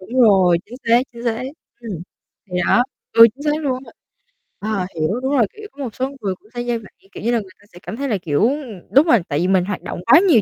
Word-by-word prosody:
Đúng 240 Hz, +7 st, -1 dB
rồi, 190 Hz, -7 st, +5 dB
chính 235 Hz, +4 st, -10 dB
xác, 235 Hz, +1 st, +6 dB
chính 235 Hz, 0 st, -10 dB
xác. 230 Hz, 0 st, -1 dB, 0.4 s
Ừm. 205 Hz, -8 st, -6 dB, 0.5 s
Thì 180 Hz, -, -1 dB
đó. 245 Hz, -, +5 dB, 0.3 s
Ừ, 230 Hz, -, +9 dB
chính 280 Hz, -, -11 dB
xác 300 Hz, +1 st, 0 dB
luôn 260 Hz, -3 st, 0 dB
á -, -, -13 dB, 0.5 s
b -, -, -31 dB
ờ, 205 Hz, -4 st, -1 dB
hiểu, 160 Hz, +8 st, 0 dB
đúng 265 Hz, +2 st, -1 dB
rồi, 235 Hz, -, +5 dB
kiểu, 430 Hz, 0 st, -10 dB
có 280 Hz, -, -7 dB
một 235 Hz, -5 st, -6 dB
số 260 Hz, +1 st, -1 dB
người 195 Hz, -2 st, -2 dB
cũng 210 Hz, -, -25 dB
sẽ 240 Hz, -, -3 dB
dê 240 Hz, -1 st, -1 dB
vậy, 220 Hz, -3 st, -12 dB, 0.2 s
kiểu -, -, -9 dB
như 235 Hz, -, +1 dB
là, 235 Hz, -, +2 dB
người 195 Hz, -3 st, -10 dB
ta 205 Hz, -, -22 dB
sẽ 175 Hz, -, -12 dB
cảm -, -, -6 dB
thấy 275 Hz, 0 st, -2 dB
là, 210 Hz, -, +1 dB
kiểu, 150 Hz, -5 st, 0 dB
ừm 260 Hz, -10 st, -5 dB
đúng 280 Hz, +5 st, +5 dB
rồi, 240 Hz, -8 st, +6 dB
tại 145 Hz, -, -1 dB
vì 175 Hz, -, +1 dB
mình 185 Hz, -1 st, +3 dB
hoạt 205 Hz, -1 st, -4 dB
động -, -, -6 dB
quá 320 Hz, -, +8 dB
nhiều 265 Hz, -, +6 dB
230 Hz, 275 wpm, -20 LUFS, 190-255 Hz, 0.5 s, Ừ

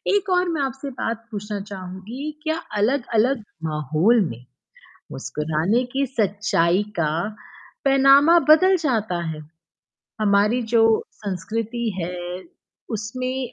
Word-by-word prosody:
एक 400 Hz, -1 st, 0 dB
और 360 Hz, -1 st, +2 dB
मैं 290 Hz, -, -1 dB
आपसे 270 Hz, +1 st, -3 dB
बात 230 Hz, 0 st, -3 dB
पूछना 210 Hz, 0 st, -4 dB
चाहूँगी, 195 Hz, +10 st, -6 dB
क्या 315 Hz, 0 st, 0 dB, 0.2 s
अलग-अलग 240 Hz, 0 st, +1 dB, 0.3 s
माहौल 155 Hz, -, +2 dB
में, 120 Hz, +2 st, -9 dB, 0.7 s
मुस्कुराने 160 Hz, +10 st, -1 dB
की 275 Hz, +1 st, +1 dB
सच्चाई 205 Hz, -5 st, +1 dB, 0.2 s
का, 155 Hz, -2 st, +1 dB, 0.7 s
पैमाना 275 Hz, +4 st, +6 dB
बदल 370 Hz, +5 st, +7 dB
जाता 215 Hz, -, 0 dB
है? 155 Hz, -1 st, -5 dB, 0.8 s
हमारी 210 Hz, +4 st, +3 dB
जो 225 Hz, -1 st, +6 dB, 0.4 s
संस्कृति 225 Hz, +4 st, -3 dB
है 175 Hz, +2 st, -3 dB, 0.8 s
उसमें 255 Hz, +3 st, -4 dB
225 Hz, 105 wpm, -22 LUFS, 190-270 Hz, 0.8 s, बदल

